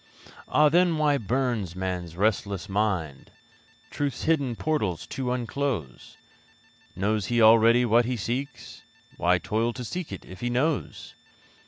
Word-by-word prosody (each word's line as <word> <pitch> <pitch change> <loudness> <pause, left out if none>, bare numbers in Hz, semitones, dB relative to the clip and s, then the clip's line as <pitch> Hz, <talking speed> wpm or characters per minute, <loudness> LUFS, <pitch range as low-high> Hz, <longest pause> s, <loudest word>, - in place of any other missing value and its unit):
Ah! 150 0 +4
then 170 +1 +3
why 150 -2 +2
burns 115 -5 -1
man's 90 -3 -4
restless 100 -3 0
mind 95 -9 -2 0.6
Truth's 140 -4 -3
hidden 140 -7 +1
portals 110 - -2
to 130 -2 -4
unclose? 125 - -4 0.8
Knows 100 +2 -1
he 120 -1 +1
already 115 +2 +6
what 120 +1 +4
he 125 0 -2
seeks? 125 +5 -5 0.4
Why 90 +1 +3
toil 110 +7 -1
to 125 - -6
seek 175 +7 -5
it, - - -8
if 95 0 -11
he 120 - -2
knows? 135 +5 -2
115 Hz, 135 wpm, -26 LUFS, 95-135 Hz, 0.8 s, already